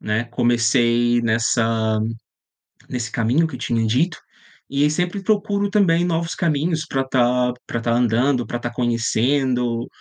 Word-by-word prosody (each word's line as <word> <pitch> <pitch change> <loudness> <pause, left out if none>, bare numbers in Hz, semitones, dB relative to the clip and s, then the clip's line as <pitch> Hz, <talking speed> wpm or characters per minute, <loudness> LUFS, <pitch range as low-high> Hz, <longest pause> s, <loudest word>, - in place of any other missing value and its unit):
né. 110 +2 -1
Comecei 120 0 +2
nessa 115 -1 +1 0.9
nesse 120 -3 -4
caminho 125 +9 +1
que 160 - -7
tinha 115 -2 -1
dito, 155 +10 0 0.5
e 145 +2 +1
sempre 180 +5 -2
procuro 205 0 0
também 180 -5 +3
novos 170 -1 -1
caminhos 160 -1 -1
pra 135 -2 -1
tá 125 -1 +2
pra 115 - -3
tá 115 - 0
andando, 120 +2 +1
pra 120 - -4
tá 120 0 -4
conhecendo, 120 +1 0
125 Hz, 130 wpm, -21 LUFS, 115-155 Hz, 0.9 s, também